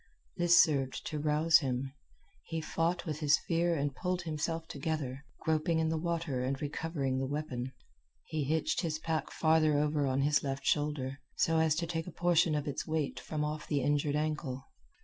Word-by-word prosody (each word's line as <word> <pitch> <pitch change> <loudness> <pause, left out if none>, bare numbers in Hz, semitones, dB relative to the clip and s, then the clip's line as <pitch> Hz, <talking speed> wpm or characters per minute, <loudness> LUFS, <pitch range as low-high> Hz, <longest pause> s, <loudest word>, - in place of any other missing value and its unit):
This 175 0 +5
served 140 -6 +2
to 150 - -3
rouse 155 +2 +4
him. 135 -1 -2 0.5
He 165 - -2
fought 165 +3 -1
with 155 -3 -3
his 150 -1 +4
fear 170 0 +2
and 145 -2 -1
pulled 180 +4 -2
himself 165 +1 -2
together, 140 -2 -3 0.2
groping 160 +1 +1
in 160 0 +1
the 160 - 0
water 165 -6 -1
and 135 +1 -1
recovering 145 -3 -2
the 135 - -1
weapon. 130 -3 -3 0.5
He 155 -2 -2
hitched 155 +5 0
his 160 -4 -1
pack 160 0 -2
farther 155 -2 +3
over 145 -1 +1
on 130 +1 +1
his 150 +1 +3
left 135 -1 -4
shoulder, 145 -3 0 0.2
so 165 -1 +2
as 160 -1 +3
to 170 +2 -1
take 165 0 -3
a - - -6
portion 170 -1 +3
of 150 0 -2
its 140 +3 -3
weight 155 -3 -1
from 150 -1 -3
off 150 0 -4
the 145 -2 +1
injured 145 0 +1
ankle. 150 -4 -2
155 Hz, 185 wpm, -32 LUFS, 140-160 Hz, 0.5 s, This